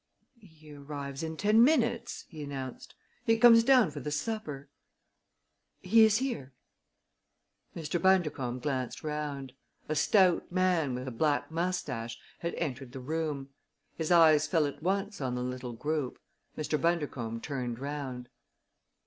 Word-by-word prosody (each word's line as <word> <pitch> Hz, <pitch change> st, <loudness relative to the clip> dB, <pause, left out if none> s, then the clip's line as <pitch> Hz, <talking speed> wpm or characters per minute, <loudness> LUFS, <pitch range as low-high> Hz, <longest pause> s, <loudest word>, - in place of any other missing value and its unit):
"He 160 Hz, -7 st, -16 dB
arrives 140 Hz, -1 st, -6 dB
in 160 Hz, 0 st, -4 dB
ten 215 Hz, +5 st, +5 dB
minutes," 255 Hz, -4 st, +1 dB
he 155 Hz, -4 st, -10 dB
announced. 135 Hz, -3 st, -7 dB, 0.3 s
"He 225 Hz, -2 st, +3 dB
comes 230 Hz, -1 st, +8 dB
down 250 Hz, -, +5 dB
for 145 Hz, -, -6 dB
the 145 Hz, -, -4 dB
supper. 150 Hz, -4 st, -4 dB, 1.2 s
He 225 Hz, 0 st, +6 dB
is 220 Hz, -1 st, +5 dB
here." 230 Hz, -, -3 dB, 1.2 s
Mr. 165 Hz, +1 st, -3 dB
Bundercombe 150 Hz, -10 st, +1 dB
glanced 130 Hz, -4 st, -3 dB
round. 145 Hz, -3 st, -4 dB, 0.3 s
A 155 Hz, -, -1 dB
stout 180 Hz, +3 st, +3 dB
man, 175 Hz, -7 st, +1 dB
with 125 Hz, +1 st, -5 dB
a -, -, -3 dB
black 145 Hz, +6 st, 0 dB
mustache, 145 Hz, -10 st, -2 dB, 0.2 s
had 170 Hz, -, -3 dB
entered 130 Hz, -2 st, -4 dB
the 135 Hz, -, -6 dB
room. 145 Hz, 0 st, -3 dB, 0.5 s
His 160 Hz, +1 st, -2 dB
eyes 155 Hz, -3 st, +6 dB
fell 160 Hz, -2 st, +2 dB
at 145 Hz, -, -5 dB
once 195 Hz, +2 st, -1 dB
on 125 Hz, -2 st, -1 dB
the 125 Hz, -, -2 dB
little 125 Hz, -1 st, -5 dB
group. 150 Hz, +2 st, -2 dB, 0.4 s
Mr. 155 Hz, 0 st, -1 dB
Bundercombe 145 Hz, -9 st, -1 dB
turned 125 Hz, -3 st, -4 dB
round. 135 Hz, -2 st, -5 dB
150 Hz, 140 wpm, -30 LUFS, 135-180 Hz, 1.2 s, comes